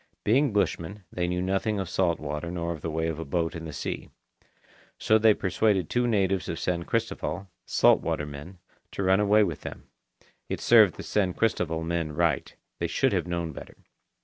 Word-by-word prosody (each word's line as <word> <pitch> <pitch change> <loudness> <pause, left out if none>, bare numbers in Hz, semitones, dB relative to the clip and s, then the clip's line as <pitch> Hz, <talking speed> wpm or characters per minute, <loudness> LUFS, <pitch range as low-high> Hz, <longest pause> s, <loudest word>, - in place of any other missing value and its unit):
Being 135 +5 +3
bushmen, 100 -1 -1
they 90 -1 -1
knew 90 0 -1
nothing 95 +3 0
of 95 - -3
salt 85 -2 +1
water 75 +2 -4
nor 85 -1 -3
of 80 - -10
the 80 - -3
way 80 +1 -1
of 80 -1 -3
a - - -3
boat 80 +3 -1
in 80 -2 -6
the 80 - -6
sea. - - -5 0.9
So 110 0 +3
they 110 -1 +5
persuaded 95 -1 +1
two 125 0 +2
natives 95 -6 +1
of - - -3
San 85 -1 -2
Cristoval, 110 -4 -2 0.2
salt - - +4
water 75 - -2
men, 75 +6 -9 0.4
to 100 - -2
run 95 +1 +4
away 105 +1 +5
with 85 -6 -3
them. - - -8 0.7
It - - -2
served 110 -6 +6
the - - -8
San 95 -4 0
Cristoval 85 -7 0
men 85 -2 -2
right. 85 0 0 0.2
They 85 - 0
should 130 +9 +1
have 90 -3 0
known 85 -2 -2
better. - - -10
90 Hz, 195 wpm, -27 LUFS, 80-105 Hz, 0.9 s, served